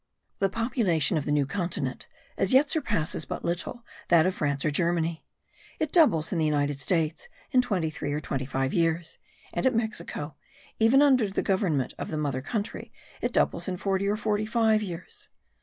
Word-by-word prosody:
The 195 -1 +2
population 200 - +1
of 150 - -1
the - - -1
New 145 -1 +2
Continent 180 +3 -3 0.3
as - - +1
yet 275 +3 +5
surpasses 160 - 0
but - - -5
little 185 +8 -3 0.2
that 170 -2 +5
of 185 - +1
France 145 -4 -1
or 155 - +2
Germany. 170 0 0 0.5
It 310 -1 -2
doubles 170 - +4
in 170 - 0
the 160 - +2
United 145 -2 0
States 160 +2 -1 0.2
in 255 - +5
twenty 185 -10 -1
three 145 - -4
or 145 - -1
twenty 135 -3 -3
five 135 0 -1
years; 165 -1 0 0.3
and - - +1
at 255 - +1
Mexico, 170 -9 -2 0.5
even 240 +6 +5
under 255 -7 +4
the 195 - -2
government 180 - 0
of - - -4
the 155 - -3
mother 140 -4 -1
country, 210 - -4 0.3
it - - -1
doubles - - +1
in 185 -1 -2
forty 195 +1 0
or 205 +1 +1
forty 215 0 -1
five 220 -1 +3
years. 180 -4 -7
175 Hz, 185 wpm, -27 LUFS, 155-220 Hz, 0.5 s, yet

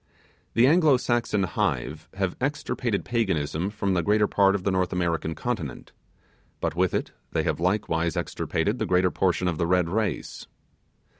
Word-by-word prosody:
The 115 - +6
Anglo 155 -2 +5
Saxon 120 -5 0
hive 75 -3 -2
have 95 -2 -1
extirpated 130 -5 -1
Paganism 95 -7 0
from 100 -2 -1
the 90 - +2
greater 105 +5 +3
part 100 -1 +3
of 95 - -3
the 100 - +1
North 95 -1 0
American 85 -2 -1
continent; 85 - -4 0.7
but - - -2
with 90 +1 +1
it - - -2 0.2
they - - +1
have - - -1
likewise 85 -3 0
extirpated 105 +9 -1
the - - -1
greater 90 0 +3
portion 90 -1 +1
of 85 -3 -1
the 85 - +1
Red 90 -1 +2
race. 105 -3 -2
95 Hz, 160 wpm, -26 LUFS, 85-110 Hz, 0.7 s, The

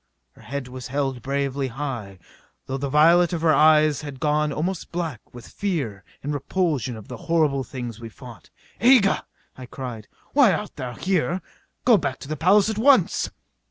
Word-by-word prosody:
Her - - -20
head 135 +3 -5
was 125 0 -8
held 135 -2 -2
bravely 140 +1 -1
high, 120 -7 -5 0.5
though 135 +1 -4
the 140 0 -2
violet 170 +5 +5
of 165 - -2
her 160 -2 +5
eyes 155 0 +5
had 145 -3 -8
gone 150 +1 +1
almost 175 +5 -3
black 165 -9 -3
with 120 -1 -11
fear 140 - -3 0.2
and 145 +2 -2
repulsion 145 - -1
of 110 - -12
the - - -7
terrible 155 -5 +1
things 120 -3 -7
we 115 -1 -8
fought. 120 0 -13 0.3
"Aga!" 235 -4 +4 0.3
I 130 -1 -10
cried. 120 -5 -7 0.3
"Why 265 -9 +6
art 205 +5 -4
thou 125 -3 -6
here! 185 +1 0 0.5
Go 235 -4 +7
back 140 -6 -2
to - - -8
the 155 - -3
palace 190 +7 +4
at 220 -1 -2
once!" 255 -6 +4
145 Hz, 175 wpm, -23 LUFS, 130-170 Hz, 0.5 s, Go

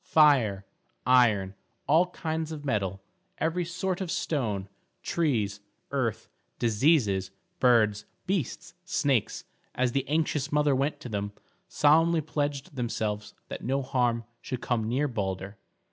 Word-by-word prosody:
Fire, 125 -11 +4 0.4
iron, 110 -7 +4 0.3
all 165 +5 +4
kinds 160 -2 -3
of 150 -2 -7
metal, 95 -7 -1 0.3
every 165 +2 0
sort 185 +2 -2
of 185 - -3
stone, 110 -13 -1 0.4
trees, 110 -12 0 0.3
earth, 130 -6 -1 0.3
diseases, 110 - +2 0.3
birds, 110 -5 +4 0.2
beasts, 180 - -2
snakes, 140 - 0 0.3
as 125 -1 +1
the 135 +1 -1
anxious 150 -1 0
mother 150 -1 +3
went 140 +3 0
to 125 - -7
them, 100 -1 -3 0.3
solemnly 165 +3 +4
pledged 145 -2 -3
themselves 110 -4 -3
that - - -7
no 135 +2 0
harm 125 -3 +1 0.2
should 130 - -4
come 115 -3 -1
near 135 +5 +1
Balder. 100 -4 -4
130 Hz, 125 wpm, -28 LUFS, 105-155 Hz, 0.4 s, Fire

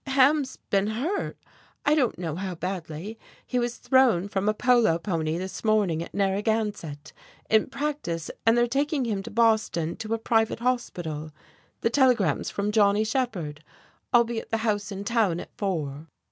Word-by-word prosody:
"Ham's 270 +1 +3
been 200 0 +3
hurt 280 - -2 0.5
I 290 - +4
don't 275 -6 +2
know 165 -3 -3
how 185 0 -4
badly 180 +3 -5 0.3
he 250 - -1
was 240 0 -1
thrown 250 -9 +3
from 200 +1 0
a - - +2
polo 240 -8 +4
pony 165 -2 -2
this 185 +1 -6
morning 210 -7 +2
at - - -7
Narragansett, 200 -6 -1 0.4
in 220 -1 +4
practice, 275 - -3
and 225 +1 +4
they're 240 - +4
taking 275 +2 0
him 210 -4 -1
to - - -8
Boston 220 -7 +2
to 220 +1 -2
a - - -2
private 225 0 +1
hospital. 175 -11 -2 0.5
The 230 - +1
telegram's 240 - +3
from 205 +1 -2
Johnny 210 -1 +4
Shephard. 215 - -2 0.5
I'll 240 -2 +6
be 230 -1 -3
at - - -11
the 225 - +1
house 205 -2 0
in 195 0 -5
town 210 -6 +1
at - - -9
four." 155 -6 -3
215 Hz, 165 wpm, -26 LUFS, 175-240 Hz, 0.5 s, I'll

